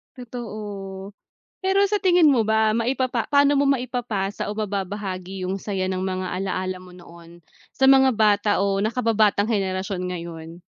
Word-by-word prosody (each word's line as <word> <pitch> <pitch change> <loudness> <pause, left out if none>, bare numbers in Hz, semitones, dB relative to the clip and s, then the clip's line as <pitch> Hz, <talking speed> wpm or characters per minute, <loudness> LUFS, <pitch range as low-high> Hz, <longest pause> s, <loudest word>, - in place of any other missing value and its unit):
Totoo. 210 -6 -7 0.5
Pero 385 +1 +2
sa 415 - +2
tingin 355 -5 +5
mo 230 -6 +2
ba 220 0 +3
maipapa 245 +1 0
paano 285 0 +4
mo 285 - +3
maipapasa 240 -7 -1
o 210 - -4
mababahagi 195 -2 -4
yung 185 +2 -2
saya 190 -2 -3
ng 185 - -2
mga 185 0 -2
alalaa 185 -1 -3
mo 180 0 -14
noon, 170 -1 -15 0.3
sa 265 0 +5
mga 265 -1 +6
bata 210 -1 +3
o 195 0 +1
nakababatang 220 -1 +1
henerasyon 190 -2 -2
ngayon? 170 -1 -7
205 Hz, 145 wpm, -23 LUFS, 185-245 Hz, 0.5 s, mga